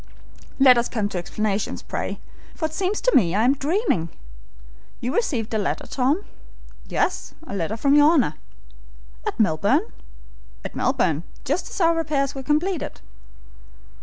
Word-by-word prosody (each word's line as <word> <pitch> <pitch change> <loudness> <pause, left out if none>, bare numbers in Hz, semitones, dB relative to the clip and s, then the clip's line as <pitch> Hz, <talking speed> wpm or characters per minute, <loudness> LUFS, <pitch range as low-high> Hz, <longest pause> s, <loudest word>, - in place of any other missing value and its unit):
"Let 255 -3 +7
us 235 - -1
come 210 -3 -1
to 185 - -3
explanations, 205 +3 -2
pray, - - -4 0.4
for 320 - -2
it 315 - -3
seems 390 +4 -1
to - - +2
me 180 -7 +4
I 215 - +3
am 255 +3 +5
dreaming. 285 - 0 0.9
You 250 +3 -2
received 245 - -1
a 220 - +1
letter, 205 - -2
Tom?" 280 +9 0 0.6
"Yes, - - -1
a - - -7
letter 200 +3 -2
from 275 +4 +3
your 295 +1 +7
Honor." 265 - +3 0.9
"At - - -3
Melbourne?" 215 - +2 0.7
"At - - -6
Melbourne, 185 - +1 0.2
just 330 +7 -1
as - - -6
our 335 -2 +4
repairs 285 -4 0
were 270 - -6
completed." 305 +4 -1
270 Hz, 150 wpm, -23 LUFS, 215-315 Hz, 0.9 s, Let